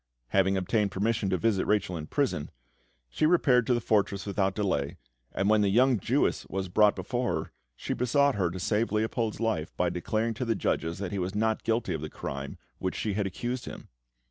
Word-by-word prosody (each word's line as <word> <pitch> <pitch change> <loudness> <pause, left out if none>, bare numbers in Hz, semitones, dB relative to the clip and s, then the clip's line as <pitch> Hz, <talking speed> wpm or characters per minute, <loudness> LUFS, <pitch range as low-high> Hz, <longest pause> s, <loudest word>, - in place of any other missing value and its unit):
Having 95 0 +3
obtained 100 +2 +1
permission 105 +2 0
to 95 - +1
visit 105 0 +1
Rachel 105 -4 +1
in 75 -2 -5
prison, 130 - -1 0.6
she 155 - +1
repaired 130 -8 +4
to 125 - +3
the - - +1
fortress 100 -3 +1
without 95 -1 0
delay, 95 -10 -1 0.3
and 100 - -1
when 110 0 +4
the 100 - +3
young 125 +3 +4
Jewess - - +1
was 95 0 -3
brought 105 +3 +4
before 125 -1 -1
her, - - -15 0.2
she - - -3
besought 140 +3 +2
her 95 -6 0
to 90 +2 -6
save 105 +4 0
Leopold's 110 0 -1
life 110 -9 -2
by 90 -1 +1
declaring 110 +6 -1
to 120 - -4
the 115 -1 +1
judges 80 -3 -1
that 100 -2 -4
he 100 - -2
was 95 +2 -3
not 110 +1 +1
guilty 115 +1 0
of - - -4
the - - -5
crime 70 0 -5
of - - -17 0.2
which 95 - -2
she 105 - -2
had 100 0 0
accused 120 +6 -4
him. - - -9
105 Hz, 210 wpm, -28 LUFS, 95-115 Hz, 0.6 s, repaired